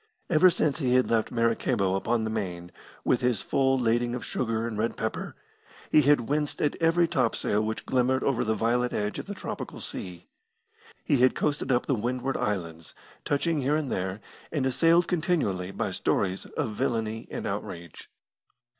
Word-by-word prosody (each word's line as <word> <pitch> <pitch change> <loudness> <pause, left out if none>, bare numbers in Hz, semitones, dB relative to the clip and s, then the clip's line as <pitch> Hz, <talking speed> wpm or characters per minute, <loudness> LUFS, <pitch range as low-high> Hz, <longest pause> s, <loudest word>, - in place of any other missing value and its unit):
Ever 175 +3 +7
since 155 -3 0
he 125 -4 +2
had 130 -2 +3
left 115 -2 +2
Maracaibo 115 -4 +1
upon 110 +4 0
the 110 - -2
Main, 90 -5 -4 0.3
with 125 - +2
his 125 -5 +1
full 135 -1 +2
lading 120 0 +1
of 120 -6 -5
sugar 115 0 -1
and 115 - -4
red 110 +2 -1
pepper, 110 - -3 0.6
he 155 - +7
had 145 -2 +4
winced 150 +1 -1
at 150 - +1
every 165 +1 +4
topsail 115 -7 +1
which 110 0 -3
glimmered 130 0 +1
over 125 -3 +1
the 110 -1 0
violet 120 +2 +1
edge 105 0 -2
of - - -7
the 205 - -5
tropical - - -6
sea. 90 -2 -6 0.8
He 145 - +2
had 130 +1 +4
coasted 145 -3 -1
up 125 -1 +2
the 140 - +1
Windward 125 +3 -1
Islands, 85 -5 -3 0.3
touching 150 +1 +1
here 140 +3 +1
and 155 -4 -1
there, 95 +2 -2 0.3
and 145 -5 0
assailed 165 +6 +3
continually 155 - 0
by - - -3
stories 95 -1 -1
of 110 - -3
villainy 110 +1 -2
and - - -5
outrage. 85 -2 -6
120 Hz, 170 wpm, -27 LUFS, 110-140 Hz, 0.8 s, Ever